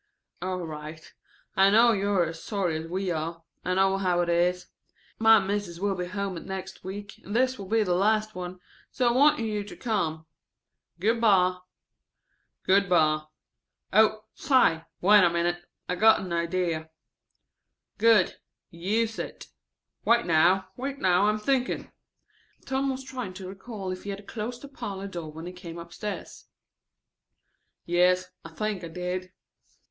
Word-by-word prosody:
("All 185 -1 -3
right. 155 0 -9 0.4
I 195 +1 +6
know 230 +3 +6
you 200 -2 0
are 190 -4 +3
as 165 0 -7
sorry 195 -6 -1
as 160 +1 -4
we 185 +2 -2
are. 165 +1 -4 0.2
I 185 - 0
know 195 0 +3
how 180 -2 +2
it 175 - -1
is. 175 +1 +2 0.5
My 225 0 +7
Mis'es 195 -3 -3
will 200 +1 0
be 180 -1 -3
at - - -9
home 200 -4 -3
next 190 0 -7
week 200 +1 -8
and 205 - -6
this 255 0 +2
will 195 - -7
be 220 +2 +2
the 180 -3 0
last 215 +3 +2
one, 180 0 -6 0.3
so 250 - 0
I - - +4
wanted 265 0 +4
you 210 -2 -2
to 205 - -10
come. 165 -9 -1 0.7
Good 225 +5 +1
by.") 185 -4 +4 1.0
"Good 195 +1 +3
by. 155 -3 +3 0.7
Oh, 215 +1 +4
say! 165 - +3 0.2
Wait 205 +2 +7
a 175 - +5
minute. 175 +1 -1 0.2
I've 180 0 -2
got 220 0 +6
an 185 -3 -5
idea." 170 -2 -1 1.1
("Good; 220 -4 +4 0.3
use 215 +7 -1
it.") - - -7 0.5
"Wait 235 0 +3
now. 180 +3 +3
Wait 275 +4 -4
now, 185 -2 +3
I - - +5
am 215 - +1
thinking." 255 +3 -1 0.7
Tom 270 +1 0
was 265 0 -3
trying 250 -8 -6
to 190 -1 -7
recall 195 0 -6
if 185 - -6
he 205 - -6
had 200 0 -6
closed 235 +4 -5
the - - -7
parlor 200 -8 -6
door 170 -5 -6
when 160 +2 -9
he 180 - -7
came 175 -2 -9
upstairs. 170 +5 -7 1.4
"Yes, 180 +1 +2
I 165 - -9
think 205 +2 -3
I - - -4
did." 180 +2 -4
190 Hz, 165 wpm, -27 LUFS, 175-215 Hz, 1.4 s, My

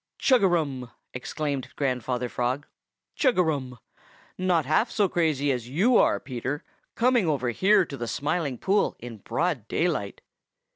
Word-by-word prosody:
"Chug 255 -3 +4
a - - +6
rum!" 140 -8 -1 0.2
exclaimed 135 0 -3
Grandfather 125 -2 -1
Frog. 125 +4 -2 0.5
"Chug 260 - +2
a 180 - +5
rum! 135 -6 -2 0.6
Not 180 -4 +1
half 185 - +2
so 205 -2 +2
crazy 155 -5 +1
as 125 -2 -3
you 200 - +3
are, - - +4
Peter, 130 +3 -4 0.3
coming 240 -5 +3
over 130 -5 0
here 195 - +4
to 140 - -8
the 120 - -4
Smiling 145 0 -2
Pool 200 - +1
in 120 -1 -9
broad 145 - -2
daylight. 155 - -1
145 Hz, 150 wpm, -26 LUFS, 125-180 Hz, 0.6 s, a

